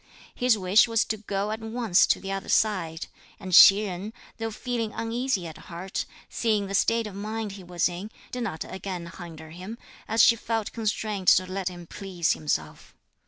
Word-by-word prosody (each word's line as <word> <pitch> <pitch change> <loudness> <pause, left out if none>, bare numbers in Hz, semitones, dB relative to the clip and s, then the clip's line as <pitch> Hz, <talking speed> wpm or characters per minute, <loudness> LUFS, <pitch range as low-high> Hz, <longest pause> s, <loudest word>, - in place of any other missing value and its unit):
His 245 -3 +3
wish 190 +4 +5
was 230 -1 +2
to 220 - -2
go 200 0 -2
at 220 - -3
once 225 -4 +2
to - - +2
the 195 - -5
other 195 0 -4
side; 175 -7 +1 0.3
and 190 -3 -6
Hsi 195 +4 +10
Jen, 195 +3 -5 0.3
though 225 0 -2
feeling 230 0 -3
uneasy 230 -3 -1
at 160 -2 -8
heart, 180 +3 -4 0.2
seeing 215 -3 0
the 195 - -6
state 230 +3 +2
of 210 - -7
mind 215 +1 -4
he 195 -1 -10
was 175 -1 0
in, 180 +4 -6 0.2
did 250 - -4
not 160 -9 -3
again 185 -3 -6
hinder 160 -3 -9
him, 185 +7 -8 0.3
as 225 0 +4
she 230 - +7
felt 225 -1 -3
constrained 215 -3 -2
to 185 - +6
let 185 0 -4
him 175 -1 -10
please 180 -2 -1
himself. 80 - -4
200 Hz, 185 wpm, -26 LUFS, 180-225 Hz, 0.3 s, Hsi